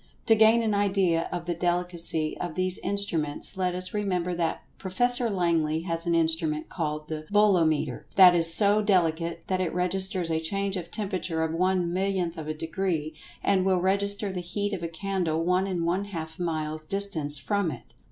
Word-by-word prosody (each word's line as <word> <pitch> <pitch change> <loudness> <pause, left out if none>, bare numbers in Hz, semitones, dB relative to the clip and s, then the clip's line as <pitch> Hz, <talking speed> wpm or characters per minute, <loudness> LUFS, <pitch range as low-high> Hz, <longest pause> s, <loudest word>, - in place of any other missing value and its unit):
To 225 - +5
gain 220 +1 +5
an 220 -2 0
idea 195 -5 +1
of 175 -1 -4
the 175 - -1
delicacy 175 -2 -1
of 175 -3 -4
these 185 0 0
instruments, 170 -6 -1
let 180 -1 -1
us 185 0 -1
remember 180 -4 -1
that 170 -2 -2 0.2
Prof. 190 -1 -8 0.2
Langley 170 -8 0
has 165 0 -2
an 170 - +2
instrument 160 -2 0
called 150 -3 -3
the 155 -1 -6
"Bolometer," 175 -8 +2
that 185 -2 +8
is 165 -1 +5
so 205 +3 +5
delicate 170 -4 +1
that 185 -1 -1
it 175 -3 -1
registers 180 -1 -1
a 160 - +1
change 195 +4 -2
of 175 -3 -5
temperature 185 -6 -2
of 160 0 -2
one 180 0 +1
millionth 185 -2 -1
of 155 -1 -7
a 155 - -2
degree, 165 -1 -2 0.3
and 190 -2 +2
will 190 -1 +2
register 200 +2 +1
the 185 - -4
heat 205 +4 -3
of - - -3
a 170 - -2
candle 165 -2 -2
one 180 +2 +1
and 175 -3 -2
one 185 +4 0
half 160 -5 -7
miles 155 -2 -3
distant 160 -5 -4
from 200 +5 -1
it. 125 -6 -9
175 Hz, 180 wpm, -27 LUFS, 165-195 Hz, 0.3 s, that